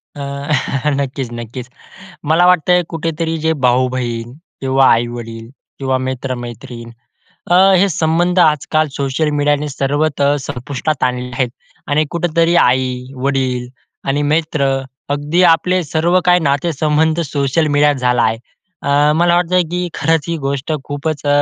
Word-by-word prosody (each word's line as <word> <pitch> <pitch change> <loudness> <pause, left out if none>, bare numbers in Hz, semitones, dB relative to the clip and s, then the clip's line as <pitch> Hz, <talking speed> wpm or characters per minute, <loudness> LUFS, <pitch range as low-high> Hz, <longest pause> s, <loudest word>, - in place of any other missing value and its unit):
अ, 145 - -7 0.7
नक्कीच, 135 -1 -3
नक्कीच. 120 +2 -7 0.6
मला 175 +2 +4
वाटतंय 180 0 +4
कुठेतरी 165 0 -2
जे 160 - +3
भाऊ-बहीण 125 -2 0 0.3
किंवा 135 0 +3
आई-वडील 115 -1 -2 0.3
किंवा 130 -1 0
मित्र-मैत्रीण. 120 -2 -6 0.6
अ, 175 - +4 0.2
हे 200 +2 +3
संबंध 170 +2 +1
आजकाल 155 -1 +2
सोशल 140 +3 -1
मीडियाने 145 0 0
सर्वतः 145 +3 0 0.2
तर 145 - +1
संपुष्टात 135 +3 -3
आणलेले 125 0 -2
आहेत 125 -1 -1 0.4
आणि 150 +2 +2
कुठेतरी 170 0 +1
आई, 125 0 0
वडील 130 -2 -1 0.4
आणि 145 +2 +1
मित्र 150 -1 0 0.4
अगदी 145 +5 +1
आपले 180 +2 0
सर्व 165 +4 +1
काही 180 0 +4
नातेसंबंध 155 +2 +1
सोशल 140 +2 0
मिडियात 145 0 +4
झाला 125 -2 +1
आहे. 110 0 +1 0.5
अ, 145 +1 +3
मला 170 +1 +3
वाटतं 180 +1 +2
की 180 0 -2
खरंच 160 0 +1
ही 170 - -1
गोष्ट 140 +1 -3
खूपच 145 +1 -4
अ, - - +1
145 Hz, 130 wpm, -16 LUFS, 130-160 Hz, 0.7 s, मला